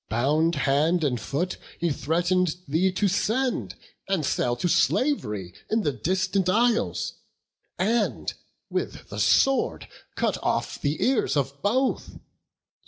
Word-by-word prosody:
Bound 150 Hz, +8 st, +2 dB
hand 150 Hz, +5 st, +2 dB
and 125 Hz, -6 st, 0 dB
foot, 170 Hz, +10 st, -2 dB, 0.2 s
he 170 Hz, -2 st, +1 dB
threaten'd 175 Hz, +4 st, +1 dB
thee 170 Hz, +7 st, +2 dB
to 205 Hz, +2 st, +1 dB
send 235 Hz, +7 st, 0 dB, 0.3 s
And 190 Hz, -6 st, 0 dB
sell 120 Hz, -2 st, 0 dB
to 150 Hz, -, -1 dB
slav'ry 105 Hz, -, +1 dB, 0.2 s
in 220 Hz, 0 st, +1 dB
the 145 Hz, -, +1 dB
distant 185 Hz, -, 0 dB
isles, 230 Hz, +3 st, +1 dB, 0.6 s
And 220 Hz, +3 st, 0 dB, 0.3 s
with -, -, -4 dB
the -, -, -6 dB
sword 270 Hz, 0 st, +2 dB, 0.3 s
cut -, -, 0 dB
off -, -, -1 dB
the 145 Hz, +2 st, 0 dB
ears 250 Hz, -, +2 dB
of 140 Hz, 0 st, -2 dB
both. 255 Hz, +6 st, 0 dB
175 Hz, 125 wpm, -25 LUFS, 140-205 Hz, 0.6 s, Bound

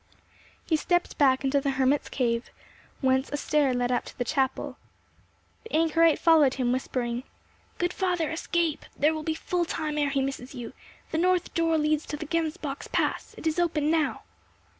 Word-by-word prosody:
He 320 Hz, -, +2 dB
stepped 350 Hz, +3 st, 0 dB
back 265 Hz, -1 st, +4 dB
into 275 Hz, +1 st, +2 dB
the 275 Hz, -, 0 dB
hermit's 270 Hz, +2 st, +2 dB
cave, 235 Hz, -2 st, -1 dB, 0.5 s
whence 265 Hz, 0 st, +2 dB
a 290 Hz, -, -2 dB
stair 290 Hz, -2 st, +2 dB
led 245 Hz, 0 st, 0 dB
up 245 Hz, -, +1 dB
to -, -, -11 dB
the 245 Hz, -, 0 dB
chapel. 265 Hz, +1 st, -1 dB, 0.9 s
The 455 Hz, -, -12 dB
anchorite 330 Hz, 0 st, +4 dB
followed 315 Hz, -5 st, +5 dB
him, 250 Hz, -2 st, 0 dB
whispering—"Good 255 Hz, +7 st, -4 dB
father, 355 Hz, -4 st, 0 dB
escape! 330 Hz, -1 st, -1 dB
There 300 Hz, +3 st, +3 dB
will 310 Hz, -, -3 dB
be 315 Hz, +1 st, -2 dB
full 350 Hz, +2 st, -1 dB
time 310 Hz, -2 st, -2 dB
ere 290 Hz, -1 st, +2 dB
he 275 Hz, -1 st, 0 dB
misses 270 Hz, -1 st, -5 dB
you. 240 Hz, -2 st, -7 dB, 0.4 s
The 320 Hz, -, 0 dB
north 360 Hz, 0 st, +1 dB
door 330 Hz, -1 st, +2 dB
leads 305 Hz, 0 st, +1 dB
to 295 Hz, -, -4 dB
the 310 Hz, -, -6 dB
Gemsbock's 315 Hz, -3 st, -2 dB
Pass; -, -, -1 dB
it -, -, -10 dB
is 320 Hz, +2 st, +1 dB
open 310 Hz, -3 st, +1 dB
now." 320 Hz, -3 st, 0 dB
300 Hz, 175 wpm, -27 LUFS, 265-330 Hz, 0.9 s, followed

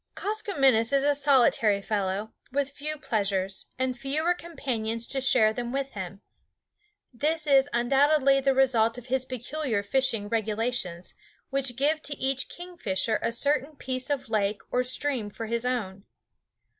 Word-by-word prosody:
Koskomenos 280 Hz, -, +1 dB
is 275 Hz, -1 st, +3 dB
a 290 Hz, -, +4 dB
solitary 260 Hz, -7 st, +3 dB
fellow, 200 Hz, +1 st, -2 dB, 0.2 s
with 280 Hz, +1 st, -1 dB
few 305 Hz, +2 st, -3 dB
pleasures, 195 Hz, -7 st, -2 dB
and 260 Hz, 0 st, -1 dB
fewer 295 Hz, +7 st, 0 dB
companions 235 Hz, -10 st, -3 dB
to 270 Hz, +1 st, -1 dB
share 250 Hz, -5 st, +4 dB
them 240 Hz, +1 st, -4 dB
with 275 Hz, 0 st, -2 dB
him. 190 Hz, 0 st, -7 dB, 0.9 s
This 310 Hz, +5 st, 0 dB
is 275 Hz, -1 st, +4 dB
undoubtedly 275 Hz, +3 st, +3 dB
the 270 Hz, 0 st, +2 dB
result 240 Hz, -3 st, +3 dB
of 245 Hz, -, -9 dB
his 260 Hz, -1 st, +1 dB
peculiar 255 Hz, -3 st, -2 dB
fishing 230 Hz, -2 st, +1 dB
regulations, 220 Hz, -4 st, -2 dB, 0.4 s
which 270 Hz, -2 st, 0 dB
give 300 Hz, +4 st, +1 dB
to 290 Hz, -2 st, -3 dB
each 270 Hz, 0 st, 0 dB
kingfisher 230 Hz, -, -2 dB
a -, -, 0 dB
certain 285 Hz, +4 st, 0 dB
piece 255 Hz, 0 st, -3 dB
of 285 Hz, -3 st, -1 dB
lake 210 Hz, -2 st, 0 dB
or 250 Hz, -, +2 dB
stream 255 Hz, -3 st, -1 dB
for 225 Hz, +2 st, -6 dB
his 235 Hz, +2 st, -1 dB
own. 205 Hz, -6 st, -3 dB
255 Hz, 145 wpm, -27 LUFS, 220-280 Hz, 0.9 s, a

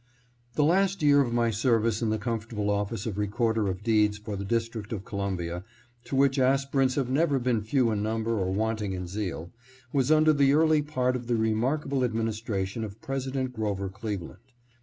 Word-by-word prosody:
THE 150 Hz, -, +3 dB
last 190 Hz, +3 st, +2 dB
year 145 Hz, -1 st, +6 dB
of 125 Hz, -4 st, -1 dB
my 115 Hz, -1 st, +2 dB
service 115 Hz, 0 st, +1 dB
in 115 Hz, -, +1 dB
the 110 Hz, -, +1 dB
comfortable 110 Hz, -2 st, -2 dB
office 100 Hz, +1 st, -2 dB
of 105 Hz, -3 st, -3 dB
Recorder 110 Hz, +1 st, 0 dB
of 95 Hz, +1 st, -3 dB
Deeds 105 Hz, -2 st, +3 dB
for 105 Hz, -1 st, -6 dB
the 100 Hz, -, -4 dB
District 115 Hz, 0 st, -2 dB
of 100 Hz, -3 st, -4 dB
Columbia, 95 Hz, -4 st, -3 dB, 0.4 s
to -, -, -4 dB
which 135 Hz, 0 st, +3 dB
aspirants 135 Hz, 0 st, +2 dB
have 135 Hz, -3 st, 0 dB
never 140 Hz, +2 st, +2 dB
been 120 Hz, -3 st, 0 dB
few 115 Hz, +2 st, +1 dB
in 105 Hz, -1 st, -1 dB
number 110 Hz, +1 st, -1 dB
or 95 Hz, -1 st, -1 dB
wanting 105 Hz, 0 st, -1 dB
in 90 Hz, -1 st, -4 dB
zeal, 90 Hz, -3 st, -4 dB, 0.4 s
was 135 Hz, -2 st, +2 dB
under 155 Hz, 0 st, +5 dB
the 140 Hz, -1 st, +4 dB
early 155 Hz, 0 st, +4 dB
part 130 Hz, -4 st, 0 dB
of 120 Hz, -2 st, -5 dB
the 120 Hz, -, +1 dB
remark 115 Hz, +7 st, 0 dB
able 135 Hz, -2 st, 0 dB
administration 110 Hz, -3 st, -2 dB
of 105 Hz, 0 st, -7 dB
President 130 Hz, -1 st, -3 dB
Grover 100 Hz, -4 st, -2 dB
Cleveland. 95 Hz, -3 st, -6 dB
115 Hz, 185 wpm, -27 LUFS, 105-130 Hz, 0.4 s, year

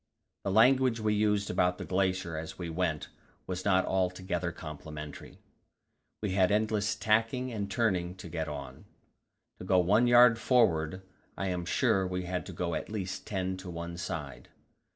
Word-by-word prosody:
The -, -, -1 dB
language 125 Hz, +3 st, +4 dB
we 110 Hz, -1 st, +1 dB
used 105 Hz, -1 st, +1 dB
about 90 Hz, 0 st, +2 dB
the -, -, -6 dB
glacier 95 Hz, -2 st, 0 dB
as 80 Hz, +1 st, -6 dB
we 85 Hz, -2 st, -5 dB
went 80 Hz, -3 st, -1 dB, 0.4 s
was 90 Hz, 0 st, -4 dB
not 95 Hz, -2 st, +3 dB
altogether 90 Hz, -2 st, -1 dB
complimentary; 75 Hz, -2 st, -9 dB, 0.9 s
we 105 Hz, -, 0 dB
had 95 Hz, 0 st, +3 dB
endless 105 Hz, -1 st, +1 dB
tacking 115 Hz, +4 st, +1 dB
and 100 Hz, -2 st, -3 dB
turning 90 Hz, -4 st, 0 dB
to 90 Hz, -, -9 dB
get 80 Hz, -1 st, -3 dB
on. 70 Hz, -3 st, -7 dB, 0.7 s
To -, -, -7 dB
go 95 Hz, 0 st, +2 dB
one 105 Hz, +7 st, +4 dB
yard 120 Hz, -1 st, +7 dB
forward, 95 Hz, -8 st, +2 dB, 0.3 s
I 95 Hz, -, -1 dB
am 90 Hz, -1 st, -2 dB
sure 95 Hz, 0 st, +2 dB
we 90 Hz, 0 st, -3 dB
had 90 Hz, 0 st, -3 dB
to -, -, -6 dB
go 85 Hz, 0 st, -3 dB
at -, -, -3 dB
least 95 Hz, -4 st, -5 dB
ten 95 Hz, -2 st, -2 dB
to 95 Hz, -1 st, -8 dB
one 85 Hz, 0 st, -5 dB
side. 80 Hz, -6 st, -6 dB
95 Hz, 165 wpm, -30 LUFS, 85-105 Hz, 0.9 s, yard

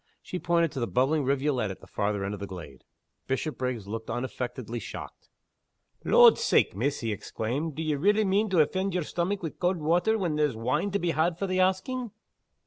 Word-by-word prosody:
She 180 Hz, -, -5 dB
pointed 170 Hz, -2 st, +2 dB
to 135 Hz, -, -5 dB
the 120 Hz, -, -1 dB
bubbling 135 Hz, +6 st, +2 dB
rivulet 135 Hz, -4 st, +1 dB
at 95 Hz, -, -7 dB
the -, -, -14 dB
farther 100 Hz, -1 st, -1 dB
end 100 Hz, -, -3 dB
of 105 Hz, -, -6 dB
the 100 Hz, -, -5 dB
glade. 85 Hz, -9 st, -10 dB, 0.4 s
Bishopriggs 130 Hz, -5 st, -2 dB
looked 110 Hz, +2 st, -5 dB
unaffectedly 120 Hz, -1 st, -4 dB
shocked. -, -, -9 dB, 0.7 s
"Lord's -, -, +7 dB
sake, -, -, +3 dB
miss," 135 Hz, +8 st, -1 dB
he 115 Hz, -2 st, -1 dB
exclaimed 130 Hz, +9 st, -3 dB
"d'ye 155 Hz, -1 st, -1 dB
relly 205 Hz, +8 st, +3 dB
mean 200 Hz, +3 st, +2 dB
to 180 Hz, -4 st, +4 dB
offend 190 Hz, +5 st, 0 dB
yer 180 Hz, -, +1 dB
stomach 180 Hz, +5 st, -2 dB
wi' 160 Hz, -, -2 dB
cauld 180 Hz, +1 st, 0 dB
water 175 Hz, +8 st, +2 dB
when 170 Hz, -7 st, -1 dB
there's 150 Hz, -5 st, +1 dB
wine 125 Hz, -, 0 dB
to 200 Hz, -, 0 dB
be 175 Hz, -3 st, 0 dB
had 165 Hz, +2 st, +1 dB
for 195 Hz, -, -2 dB
the 185 Hz, -1 st, -1 dB
asking!" 190 Hz, +7 st, 0 dB
150 Hz, 195 wpm, -28 LUFS, 120-185 Hz, 0.7 s, Lord's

